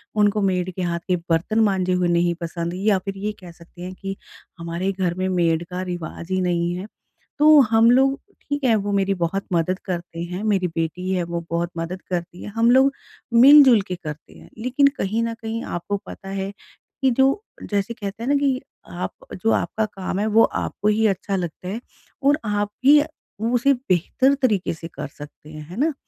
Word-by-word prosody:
उनको 210 Hz, 0 st, +3 dB
मेड 185 Hz, -1 st, 0 dB
के 185 Hz, -, -4 dB
हाथ 170 Hz, -1 st, -1 dB
के 180 Hz, -, +2 dB
बर्तन 175 Hz, +7 st, +1 dB
माँजे 185 Hz, -3 st, +1 dB
हुए 180 Hz, -1 st, +1 dB
नहीं 170 Hz, 0 st, +2 dB
पसंद 170 Hz, +1 st, -3 dB
या 200 Hz, +1 st, +2 dB
फिर 195 Hz, 0 st, -4 dB
ये 210 Hz, +2 st, -2 dB
कह 180 Hz, -2 st, -11 dB
सकते 170 Hz, +1 st, -16 dB
हैं 185 Hz, +1 st, -6 dB
कि 195 Hz, 0 st, -4 dB, 0.4 s
हमारे 170 Hz, +3 st, -2 dB
घर 185 Hz, -3 st, -1 dB
में 185 Hz, +1 st, -2 dB
मेड 170 Hz, -2 st, +1 dB
का 180 Hz, 0 st, -4 dB
रिवाज 175 Hz, -2 st, -6 dB
ही 185 Hz, -, +1 dB
नहीं 175 Hz, -1 st, 0 dB
है। 185 Hz, +4 st, -6 dB, 0.5 s
तो 305 Hz, 0 st, +8 dB
हम 225 Hz, +1 st, +6 dB
लोग 270 Hz, +2 st, +3 dB, 0.3 s
ठीक 285 Hz, -1 st, -2 dB
है 230 Hz, -, +4 dB
वो 205 Hz, -1 st, -1 dB
मेरी 195 Hz, 0 st, +2 dB
बहुत 180 Hz, +3 st, -2 dB
मदद 180 Hz, +3 st, +1 dB
करते 170 Hz, -2 st, -5 dB
हैं, 180 Hz, +4 st, -5 dB
मेरी 195 Hz, -4 st, +1 dB
बेटी 165 Hz, +3 st, -3 dB
है 180 Hz, -2 st, 0 dB
वो 170 Hz, 0 st, -3 dB
बहुत 170 Hz, +1 st, 0 dB
मदद 175 Hz, +3 st, -4 dB
करती 175 Hz, 0 st, -4 dB
है -, -, -6 dB
हम 230 Hz, +1 st, +4 dB
लोग 265 Hz, +2 st, +5 dB, 0.4 s
मिलजुल 260 Hz, -2 st, +8 dB
के 180 Hz, -, -3 dB
करते 150 Hz, -3 st, -9 dB
हैं -, -, -16 dB
लेकिन 255 Hz, +4 st, +3 dB
कहीं 220 Hz, +4 st, 0 dB
न 230 Hz, 0 st, -2 dB
कहीं 225 Hz, +1 st, -4 dB
आपको 190 Hz, +4 st, -3 dB
पता 195 Hz, -, -9 dB
है 195 Hz, 0 st, -3 dB, 0.5 s
कि 265 Hz, -1 st, +4 dB
जो 270 Hz, -, +2 dB, 0.3 s
जैसे 205 Hz, +3 st, 0 dB
कहते 215 Hz, 0 st, -6 dB
हैं 260 Hz, -, -2 dB
ना 285 Hz, -, +4 dB
कि 275 Hz, -2 st, +1 dB, 0.3 s
आप -, -, -4 dB, 0.3 s
जो 225 Hz, -, +3 dB
आपका 220 Hz, -1 st, 0 dB
काम 195 Hz, -2 st, -4 dB
है 215 Hz, -, 0 dB
वो 220 Hz, +1 st, +5 dB, 0.2 s
आपको 210 Hz, -, -3 dB
ही 220 Hz, +1 st, +2 dB
अच्छा 195 Hz, 0 st, -1 dB
लगता 180 Hz, 0 st, -4 dB
है 225 Hz, +5 st, -4 dB, 0.5 s
और 295 Hz, +2 st, +3 dB
आप 205 Hz, 0 st, 0 dB, 0.2 s
ही 295 Hz, +1 st, +8 dB
उ -, -, -2 dB, 0.5 s
उसे 275 Hz, +3 st, +4 dB
बेहतर 250 Hz, +4 st, +1 dB
तरीक़े 210 Hz, -9 st, +1 dB
से 165 Hz, +1 st, -8 dB
कर 160 Hz, -, -7 dB
सकते 145 Hz, +1 st, -13 dB
हैं, 155 Hz, 0 st, -9 dB
है 180 Hz, -, -8 dB
ना? 310 Hz, +1 st, +2 dB
195 Hz, 205 wpm, -22 LUFS, 175-225 Hz, 0.5 s, तो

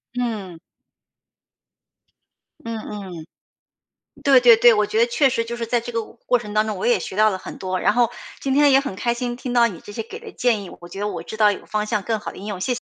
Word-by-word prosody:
嗯。 210 Hz, -9 st, -3 dB, 2.0 s
嗯 230 Hz, -1 st, -5 dB
嗯。 195 Hz, -7 st, -8 dB, 1.0 s
对 275 Hz, -2 st, +6 dB
对 240 Hz, -2 st, +8 dB
对， 235 Hz, 0 st, +6 dB
我 210 Hz, 0 st, +2 dB
觉 215 Hz, +1 st, -1 dB
得 235 Hz, -, +5 dB
确 265 Hz, +3 st, +2 dB
实 230 Hz, -2 st, -1 dB
就 235 Hz, +1 st, -5 dB
是 235 Hz, -, -3 dB
在 240 Hz, +1 st, +1 dB
这 240 Hz, +1 st, -7 dB
个 230 Hz, 0 st, -1 dB
我 -, -, -13 dB
过 250 Hz, -, +3 dB
程 210 Hz, -3 st, -8 dB
当 215 Hz, +1 st, +2 dB
中， 215 Hz, -2 st, -3 dB
我 185 Hz, -, -3 dB
也 240 Hz, -, +4 dB
学 190 Hz, -, -7 dB
到 215 Hz, +1 st, +5 dB
了 190 Hz, -, -3 dB
很 -, -, -9 dB
多。 185 Hz, -1 st, -2 dB
然 -, -, +3 dB
后 240 Hz, -1 st, +2 dB, 0.3 s
今 270 Hz, -, -1 dB
天 285 Hz, +1 st, +5 dB
也 270 Hz, -, +6 dB
很 275 Hz, -9 st, -5 dB
开 235 Hz, +2 st, 0 dB
心， 240 Hz, 0 st, -3 dB
听 250 Hz, 0 st, -5 dB
到 240 Hz, -1 st, +5 dB
你 190 Hz, -8 st, -6 dB
这 205 Hz, -, -11 dB
些 225 Hz, -, -4 dB
给 415 Hz, -, -9 dB
的 460 Hz, -2 st, -10 dB
建 230 Hz, -5 st, +1 dB
议， 185 Hz, -, -9 dB
我 175 Hz, -, -11 dB
觉 195 Hz, +3 st, -8 dB
得 210 Hz, -, -1 dB
我 -, -, -5 dB
知 220 Hz, -, -8 dB
道 210 Hz, -1 st, +5 dB
有 -, -, -8 dB
方 210 Hz, 0 st, -2 dB
向 210 Hz, -2 st, -1 dB
更 225 Hz, +2 st, -1 dB
好 -, -, -6 dB
地 -, -, -12 dB
应 195 Hz, -, -9 dB
用， 200 Hz, -3 st, -5 dB
谢 250 Hz, +5 st, 0 dB
谢 -, -, -5 dB
225 Hz, 285 characters per minute, -22 LUFS, 205-245 Hz, 2.0 s, 对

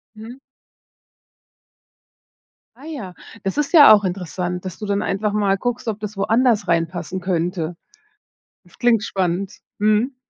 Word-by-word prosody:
Mhm. 225 Hz, +4 st, -10 dB, 2.4 s
Ah 265 Hz, -, -16 dB
ja. 270 Hz, -, -7 dB, 0.3 s
Das 195 Hz, +5 st, -3 dB
ist 295 Hz, -1 st, 0 dB
ja 295 Hz, -9 st, +9 dB
auch 205 Hz, -, +4 dB
interessant, 180 Hz, -1 st, -4 dB
dass 185 Hz, -, -6 dB
du 215 Hz, -, -6 dB
dann 200 Hz, 0 st, 0 dB
einfach 205 Hz, +2 st, -1 dB
mal 200 Hz, -2 st, +1 dB
guckst, 245 Hz, +2 st, -3 dB
ob 215 Hz, -, -2 dB
das 210 Hz, -1 st, -6 dB
woanders 225 Hz, 0 st, +2 dB
reinpassen 170 Hz, +2 st, -1 dB
könnte. 175 Hz, -1 st, -2 dB, 0.9 s
Das 175 Hz, -, -23 dB
klingt 240 Hz, -3 st, +3 dB
spannend. 190 Hz, -1 st, -2 dB, 0.3 s
Mhm. 215 Hz, +5 st, +2 dB
200 Hz, 135 wpm, -21 LUFS, 180-225 Hz, 2.4 s, ja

